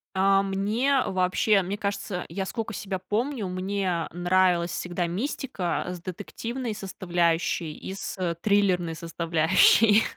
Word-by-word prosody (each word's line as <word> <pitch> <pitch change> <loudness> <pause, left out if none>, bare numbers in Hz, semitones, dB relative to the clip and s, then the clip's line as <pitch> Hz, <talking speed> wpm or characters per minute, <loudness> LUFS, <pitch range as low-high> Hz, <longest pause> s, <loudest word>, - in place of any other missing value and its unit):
А, 195 +1 +4
мне 215 +8 +1
вообще, 185 +2 +2
мне 190 +3 -3
кажется, 200 -3 -3
я 195 -1 -3
сколько 225 +2 -4
себя 195 -1 -3
помню, 215 +5 -2
мне 185 -2 -1
нравилась 175 0 +2
всегда 175 0 -2
мистика 185 - -2
с 180 -1 -6
детективной 225 +6 -5
составляющей 175 -4 -1
и 190 - -7
с, 195 - -6
э, 180 -2 -1
триллерной 185 -5 +2
составляющей, 170 +6 +4
190 Hz, 125 wpm, -26 LUFS, 175-205 Hz, -, А